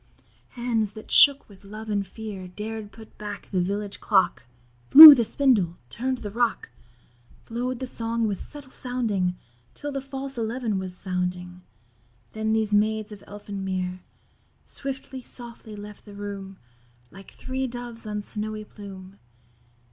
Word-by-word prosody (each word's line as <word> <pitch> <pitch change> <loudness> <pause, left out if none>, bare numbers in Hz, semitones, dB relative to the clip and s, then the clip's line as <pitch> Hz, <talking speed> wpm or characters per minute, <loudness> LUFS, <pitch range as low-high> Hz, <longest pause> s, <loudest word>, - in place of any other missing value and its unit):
Hands 230 -4 0
that 215 0 -11
shook 285 -1 +6
with 200 -1 -18
love 215 +2 -9
and 200 -2 -1
fear 200 -2 -8
Dared 210 +3 -7
put 220 +1 -15
back 210 -1 -7
the 185 -2 +1
village 200 +2 -3
clock, 190 - +2 0.4
Flew 310 0 +14
the 245 -4 +2
spindle, 215 -9 +2
turn'd 255 - -2
the 205 - -5
rock, 235 +1 0 0.7
Flow'd 245 +2 -3
the 260 - -3
song 230 -2 -2
with 200 -3 -3
subtle 285 -3 -11
rounding, 215 -8 -1 0.4
Till 290 - -4
the 275 -1 -3
false 270 -1 -3
'eleven' 225 -2 -2
was 185 -1 -7
sounding; 180 -1 -4 0.7
Then 220 0 -1
these 220 -1 0
Maids 215 +1 +1
of 205 -2 -11
Elfin 205 -1 -7
Mere 185 -1 -3 0.6
Swiftly, 265 -1 -4
softly, 235 -3 -7
left 205 0 -11
the 205 -1 -12
room, 200 -1 -7 0.5
Like 195 +1 -13
three 260 0 -3
doves 240 -2 -8
on 210 -1 -3
snowy 215 0 -2
plume. 195 -2 -11
215 Hz, 145 wpm, -25 LUFS, 195-240 Hz, 0.7 s, Flew